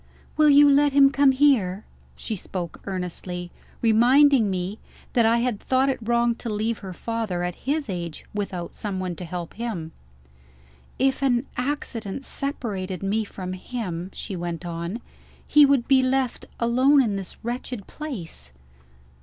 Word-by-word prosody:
"Will 305 -1 +5
you 290 0 +8
let 285 0 +4
him 275 -1 +6
come 275 0 +5
here?" 245 -9 +2 0.3
She 220 - -4
spoke 180 -2 -6
earnestly; 180 -1 -5 0.3
reminding 240 +2 +5
me 185 +3 -3 0.3
that 235 -2 +4
I 230 +1 +4
had 240 -4 -1
thought 260 +1 +2
it 265 - -1
wrong 235 +1 +2
to 235 - -5
leave 215 +2 -1
her 190 -2 -7
father, 215 -2 -3
at 180 0 -2 0.2
his 300 -1 0
age, 170 -5 -5
without 190 -4 -4
someone 185 -4 -4
to 180 - -6
help 170 0 -6
him. 205 -9 -4 1.1
"If 265 +1 +1
an 255 -2 +2
accident 250 -3 -3
separated 200 -10 -3
me 210 +3 0
from 185 -2 -6
him," 185 -3 -5
she 195 - -6
went 175 0 -4
on, 170 +6 -4 0.4
"he 295 -1 +6
would 275 -4 +2
be 270 -1 +5
left 260 -1 0
alone 260 +4 +4
in 210 -4 -1
this 195 -2 -6
wretched 240 -3 -4
place." 175 - -7
225 Hz, 150 wpm, -24 LUFS, 185-265 Hz, 1.1 s, you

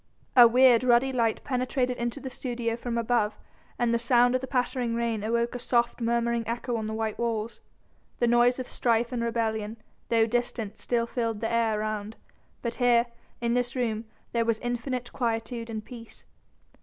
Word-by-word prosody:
A 245 -2 +10
weird, 250 0 +5
ruddy 255 +2 +3
light 230 -3 0
penetrated 255 -1 -1
into 240 +3 -3
the 265 -2 -7
studio 240 -2 -2
from 235 0 -4
above 230 -2 +1 0.4
and 240 -1 +1
the 235 - +2
sound 245 0 +4
of 255 - +1
the 265 - -5
pattering 250 -2 -1
rain 230 -3 -1
awoke 235 +2 0
a 245 - -4
soft, 240 0 0
murmuring 235 0 +1
echo 240 +1 -2
on 220 -1 -2
the 220 - -4
white 220 -1 -3
walls. 230 -1 -2 0.6
The 240 - +2
noise 240 +1 +4
of 255 -1 -5
strife 235 0 +1
and 245 -2 -2
rebellion, 225 -2 -1 0.3
though 230 -1 +4
distant, 230 -2 -2
still 235 -1 0
filled 230 -2 -2
the 225 - -2
air 225 -2 +1
around, 215 0 -3 0.5
but 235 -1 -2
here, 240 -1 +5 0.4
in 235 0 +1
this 245 +1 0
room, 230 -3 -1 0.3
there 235 -1 +1
was 230 -1 +1
infinite 245 0 -3
quietude 230 -1 -2
and 215 -1 -5
peace. 230 -3 -11
235 Hz, 180 wpm, -27 LUFS, 230-245 Hz, 0.6 s, A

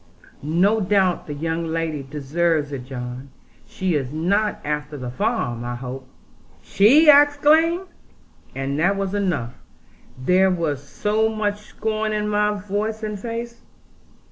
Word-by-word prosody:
No 180 +9 +2
doubt 190 -2 +1
the 150 - -4
young 165 +2 -2
lady 160 -2 -2
deserves 150 +2 -1
it, 130 -3 -6
John. 125 0 -7 0.4
She 185 -2 -2
is 135 -4 -1
not 195 +7 0
after 150 0 -3
the 125 -2 -5
farm, 125 - -1
I 120 0 -4
hope?' 130 +1 -7 0.6
'She!' 265 - +5
I 285 0 +9
exclaimed; 310 +5 +3 0.7
and 135 +2 -2
that 185 +5 +3
was 195 -1 -3
enough, 175 -13 -1 0.6
there 180 +9 +3
was 165 -7 -1
so 210 +9 0
much 210 -2 -2
scorn 215 0 -2
in 210 0 -1
my 210 0 +1
voice 210 +2 -3
and 210 -2 -4
face. 235 +2 -6
180 Hz, 140 wpm, -22 LUFS, 145-215 Hz, 0.7 s, I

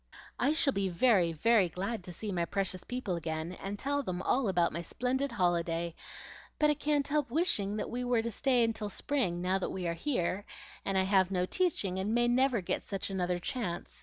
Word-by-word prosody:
"I 265 +4 +3
shall 295 -3 +3
be 195 -1 0
very, 185 -2 +3
very 195 +3 +3
glad 195 +5 -3
to 180 - -6
see 210 +4 -5
my 175 -2 0
precious 190 -1 -2
people 245 -7 -3
again, 160 0 -3
and 195 +2 -5
tell 285 +5 0
them 185 -7 -4
all 255 -2 +2
about 175 -3 +2
my 170 - -3
splendid 255 - -1
holiday; 170 -4 0 0.6
but 300 0 +4
I - - +3
can't 295 -1 0
help 295 -2 0
wishing 225 - +1
that 210 - -3
we 245 +1 -2
were 245 -2 +1
to 230 - -2
stay 245 +1 +3
till 220 -2 -4
spring, 190 -7 -1
now 185 +1 +1
that - - -2
we 180 -2 -3
are 170 - 0
here, 190 - -1 0.4
and 195 -1 0
I 190 - +4
have 190 -1 +3
no 180 -2 +1
teaching, 200 - 0
and 210 +4 0
may 240 0 +3
never 250 -2 +3
get 175 - -2
such 195 0 -3
another 180 -2 0
chance. 175 -1 -4
200 Hz, 210 wpm, -31 LUFS, 180-250 Hz, 0.6 s, but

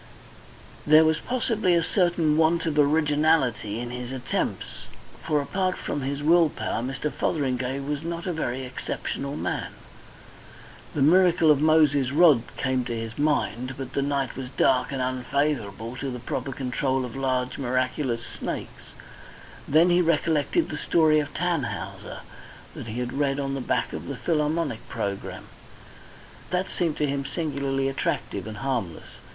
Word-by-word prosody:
There 155 +1 +7
was 160 0 +2
possibly 225 -7 +1
a 170 - +3
certain 175 -4 +2
want 165 +1 +3
of 150 -2 0
originality 150 -7 +2
in 120 0 -5
his 125 0 -5
attempts, 130 -2 -3 0.4
for, 150 - +1
apart 185 +5 -1
from 145 - -3
his 140 +2 -3
will 165 +1 +5
power, 115 - -3
Mr. 135 +3 -3
Fotheringay 135 -3 -1
was 145 +1 -3
not 170 +1 -4
a 180 - -1
very 130 -5 -2
exceptional 140 +2 -4
man. - - -3 1.2
The 140 - +2
miracle 170 0 +5
of 145 -1 +3
Moses' 150 -4 +4
rod 150 -5 +6 0.2
came 130 -1 0
to 120 - -3
his 115 +2 -6
mind, 130 -4 0
but 130 -1 -6
the 140 - +1
night 140 -2 -1
was 130 -1 -6
dark 130 +1 +2
and 135 -2 -1
unfavourable 125 -3 -1
to 135 +1 -3
the 125 - -4
proper 125 +2 -4
control 130 0 -1
of 125 - -8
large 130 -2 -1
miraculous 130 -1 -1
snakes. - - -7 0.7
Then 165 +5 +5
he 175 +1 +4
recollected 165 - +1
the - - -4
story 155 -2 +3
of 145 -1 -3
"Tannhäuser" 105 - -3 0.5
that - - -8
he 115 +2 -4
had 125 0 -3
read 140 0 0
on 135 -1 -2
the 135 - -3
back - - -1
of - - -6
the - - -5
Philharmonic 150 -5 -1
programme. 100 -1 -4 1.0
That 185 +1 -1
seemed 165 -4 -1
to 150 - +1
him 140 -1 -1
singularly 140 -4 -1
attractive 110 -6 -2
and 110 -1 -7
harmless. 115 -12 -2
140 Hz, 155 wpm, -25 LUFS, 125-160 Hz, 1.2 s, There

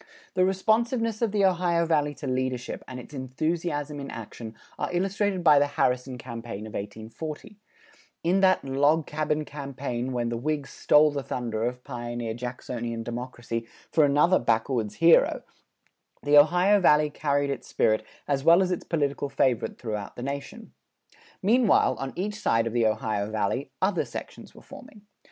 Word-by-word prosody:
The 185 - +3
responsiveness 225 +4 +1
of 230 -3 +1
the 200 -1 +2
Ohio 175 -2 +2
Valley 150 -3 +1
to 145 - -8
leadership 130 -1 -2
and 130 -1 -7
its 125 - -12
enthusiasm 145 +2 -2
in 140 - -6
action 110 0 -8 0.2
are - - -2
illustrated 195 +1 0
by 150 -3 +7
the 145 - +3
Harrison 125 -2 0
campaign 115 -3 -7
of 110 - -10
1840; 115 - -7 0.6
in 180 +4 +2
that 185 -5 +3
"log 145 +4 +2
cabin 150 0 -1
campaign" 135 -3 -4
when 120 -2 -1
the 120 - -2
Whigs 145 +2 -2
"stole 150 0 +4
the 145 -1 -3
thunder" 115 -3 -3
of 125 +1 -4
pioneer 120 -1 -4
Jacksonian 120 -1 -5
democracy 120 -1 -5 0.2
for 155 - +4
another 150 +6 +4
backwoods 115 -2 0
hero, 165 0 +4 0.8
the 145 0 +3
Ohio 180 +7 +6
Valley 150 -4 +4
carried 145 -1 0
its 140 - -5
spirit 110 0 +1 0.2
as 140 -2 0
well 170 +4 +6
as 185 - -1
its 180 - -2
political 145 -3 -1
favorite 130 -4 0
throughout 105 -4 -5
the 120 - -7
nation. 140 +1 -6 0.7
Meanwhile, 230 +3 +4
on 135 -1 -4
each 205 +3 -3
side 115 0 +2
of 115 - -3
the 120 -2 +3
Ohio 110 -1 -1
Valley, 110 +6 -1
other 190 -1 +1
sections - - -9
were - - -14
forming. 210 -2 -13
140 Hz, 160 wpm, -26 LUFS, 120-170 Hz, 0.8 s, by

